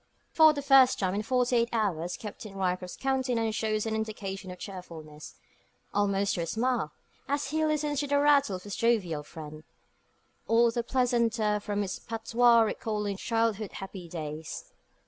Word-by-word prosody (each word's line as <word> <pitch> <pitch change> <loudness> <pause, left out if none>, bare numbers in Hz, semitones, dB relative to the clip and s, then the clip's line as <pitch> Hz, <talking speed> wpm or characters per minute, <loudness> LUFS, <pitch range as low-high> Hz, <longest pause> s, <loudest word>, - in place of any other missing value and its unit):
For 315 -1 +7
the 285 -2 -4
first 270 -2 +6
time 185 -2 0
in 205 - -1
forty 250 +2 +1
eight 235 0 +2
hours 180 -7 -1
Captain 210 -1 -8
Ryecroft's 180 -1 -2
countenance 255 -4 0
shows 215 0 -1
an 220 - -2
indication 205 -3 -4
of 180 - -7
cheerfulness 165 -6 -9 0.6
almost 200 -1 +1
to 175 - -2
a 165 - -3
smile, 230 -6 0 0.4
as 285 0 -1
he 315 0 +1
listens 300 -2 0
to 290 - -1
the 285 0 +2
rattle 285 -8 +4
of 185 - -8
his 205 - -6
jovial 200 -10 +1
friend, 155 0 -10 0.8
all 230 +1 +4
the 235 +1 -1
pleasanter 235 -4 +1
from 205 0 -2
its 190 - -4
patois 230 +1 +3
recalling 210 -3 -1
childhood's 225 -2 -1
happy 190 -3 -8
days. 155 -1 -6
220 Hz, 160 wpm, -29 LUFS, 190-245 Hz, 0.8 s, For